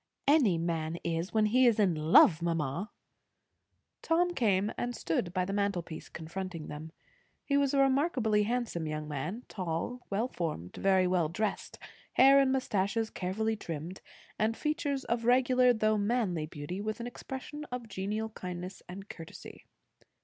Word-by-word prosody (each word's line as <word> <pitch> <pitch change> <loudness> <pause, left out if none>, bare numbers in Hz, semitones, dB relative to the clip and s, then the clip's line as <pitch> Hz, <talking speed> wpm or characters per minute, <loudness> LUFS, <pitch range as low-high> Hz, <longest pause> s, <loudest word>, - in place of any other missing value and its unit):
"Any 270 - +5
man 165 -1 -2
is, 170 +3 -2
when 215 -1 +3
he 250 +4 +4
is 230 - +4
in 195 -4 +4
love, 155 +1 +6
mamma." 165 +3 -1 1.1
Tom 350 +2 +2
came 205 - +2
and 245 0 -3
stood 170 -1 -1
by 180 0 0
the 195 - -3
mantelpiece, 190 -5 -2
confronting 170 0 -6
them. 155 +2 -7 0.5
He 280 - +1
was 280 -1 +3
a - - +3
remarkably 265 -6 +2
handsome 220 -7 -1
young 155 0 -4
man; 165 - -4
tall, 185 +6 -3
well 210 +5 0
formed, 155 - -4
very 190 -1 +3
well 180 -3 +1
dressed, 205 +4 -3 0.4
hair 275 +1 +7
and 270 -1 +3
moustaches 225 -3 0
carefully 220 +5 -1
trimmed, 170 -2 -6 0.4
and 220 +1 +1
features 290 -3 -1
of 235 0 -1
regular 250 0 +5
though 215 -2 +2
manly 200 -7 0
beauty, 155 +5 -6
with 215 +1 -3
an 235 - -4
expression 265 +4 -7
of 250 -4 -6
genial 210 +2 -3
kindness 180 -2 -7
and 195 +3 -8
courtesy. 165 -4 -11
205 Hz, 150 wpm, -31 LUFS, 170-245 Hz, 1.1 s, hair